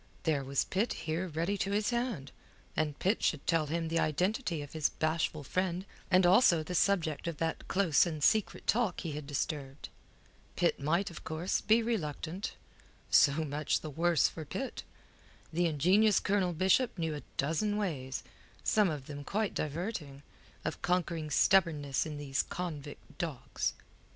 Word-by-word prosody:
There 150 Hz, -4 st, +1 dB
was 135 Hz, 0 st, +1 dB
Pitt 210 Hz, +6 st, 0 dB
here 165 Hz, +4 st, -1 dB
ready 170 Hz, +5 st, -1 dB
to 195 Hz, -, 0 dB
his 210 Hz, +3 st, +1 dB
hand, 235 Hz, -, -2 dB, 0.4 s
and 150 Hz, -2 st, -1 dB
Pitt 195 Hz, +5 st, +1 dB
should 150 Hz, -3 st, 0 dB
tell 165 Hz, -3 st, +2 dB
him 165 Hz, +2 st, -1 dB
the 165 Hz, +1 st, 0 dB
identity 175 Hz, -, 0 dB
of 145 Hz, -, -11 dB
his 155 Hz, -2 st, +1 dB
bashful 155 Hz, -1 st, -1 dB
friend, 185 Hz, +4 st, -1 dB, 0.2 s
and 185 Hz, -1 st, +5 dB
also 175 Hz, -3 st, +5 dB
the 180 Hz, -, -5 dB
subject 170 Hz, -4 st, +1 dB
of 170 Hz, -3 st, -3 dB
that 165 Hz, +1 st, -2 dB
close 180 Hz, -5 st, +3 dB
and 155 Hz, -3 st, -4 dB
secret 215 Hz, +3 st, +2 dB
talk 220 Hz, -5 st, +1 dB
he 165 Hz, -, -4 dB
had 150 Hz, -1 st, -6 dB
disturbed. 140 Hz, -1 st, -4 dB, 0.7 s
Pitt -, -, +1 dB
might, 170 Hz, +7 st, 0 dB
of 170 Hz, -, -10 dB
course, 160 Hz, +4 st, -1 dB
be 225 Hz, +2 st, +4 dB
reluctant. 180 Hz, -4 st, -3 dB, 0.6 s
So 150 Hz, +2 st, +5 dB
much 145 Hz, +1 st, -1 dB
the 155 Hz, -, -6 dB
worse 165 Hz, +1 st, +3 dB
for 160 Hz, -, -7 dB
Pitt. 255 Hz, -, -5 dB, 0.7 s
The 175 Hz, +1 st, +2 dB
ingenious 185 Hz, +8 st, +4 dB
Colonel 190 Hz, -3 st, +1 dB
Bishop 190 Hz, +7 st, +2 dB
knew 165 Hz, -2 st, -1 dB
a 150 Hz, -, -5 dB, 0.2 s
dozen 165 Hz, +9 st, 0 dB
ways 135 Hz, -10 st, -3 dB, 0.4 s
some 210 Hz, -3 st, +3 dB
of 145 Hz, -4 st, -4 dB
them 145 Hz, 0 st, -7 dB
quite 210 Hz, +7 st, -1 dB
diverting 150 Hz, -3 st, -4 dB, 0.4 s
of -, -, -3 dB
conquering 170 Hz, -3 st, 0 dB
stubbornness 150 Hz, -5 st, +3 dB
in 150 Hz, -1 st, -5 dB
these 145 Hz, -1 st, 0 dB
convict 155 Hz, -5 st, -7 dB
dogs. 160 Hz, -8 st, -2 dB
165 Hz, 160 wpm, -32 LUFS, 150-190 Hz, 0.7 s, and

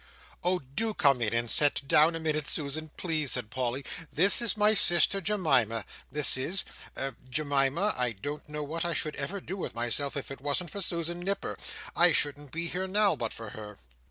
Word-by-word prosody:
"Oh 180 Hz, +1 st, +1 dB
do 180 Hz, -, -3 dB
come 140 Hz, -7 st, +3 dB
in 105 Hz, -3 st, 0 dB
and 115 Hz, 0 st, 0 dB
sit 145 Hz, +2 st, +2 dB
down 155 Hz, +4 st, +4 dB
a -, -, -3 dB
minute, 155 Hz, -2 st, -1 dB
Susan, 155 Hz, +1 st, -1 dB
please," 155 Hz, -6 st, +1 dB
said 120 Hz, -4 st, -3 dB
Polly. 130 Hz, +1 st, -3 dB, 0.3 s
"This 195 Hz, +8 st, +4 dB
is 225 Hz, -3 st, +1 dB
my 210 Hz, +1 st, +4 dB
sister 175 Hz, 0 st, +6 dB
Jemima, 135 Hz, -, +1 dB, 0.3 s
this 150 Hz, -3 st, +4 dB
is. 170 Hz, +9 st, +1 dB, 0.7 s
Jemima, 145 Hz, +7 st, +1 dB
I 125 Hz, -2 st, -1 dB
don't 145 Hz, +9 st, -7 dB
know 150 Hz, 0 st, -4 dB
what 160 Hz, +3 st, -4 dB
I 170 Hz, -1 st, -1 dB
should 155 Hz, -, -1 dB
ever 170 Hz, +9 st, -3 dB
do 190 Hz, +1 st, -7 dB
with 180 Hz, -, -5 dB
myself, 120 Hz, +5 st, -2 dB
if 140 Hz, -, -6 dB
it 135 Hz, -, -9 dB
wasn't 145 Hz, +4 st, -1 dB
for 200 Hz, -, -5 dB
Susan 170 Hz, -1 st, -1 dB
Nipper; 195 Hz, +3 st, -3 dB, 0.4 s
I 175 Hz, -1 st, +5 dB
shouldn't 145 Hz, -1 st, -1 dB
be 165 Hz, +3 st, -2 dB
here 185 Hz, +2 st, -3 dB
now 205 Hz, +1 st, +2 dB
but 115 Hz, -2 st, -4 dB
for 115 Hz, -2 st, -9 dB
her." 105 Hz, -1 st, -9 dB
150 Hz, 190 wpm, -28 LUFS, 135-175 Hz, 0.7 s, sister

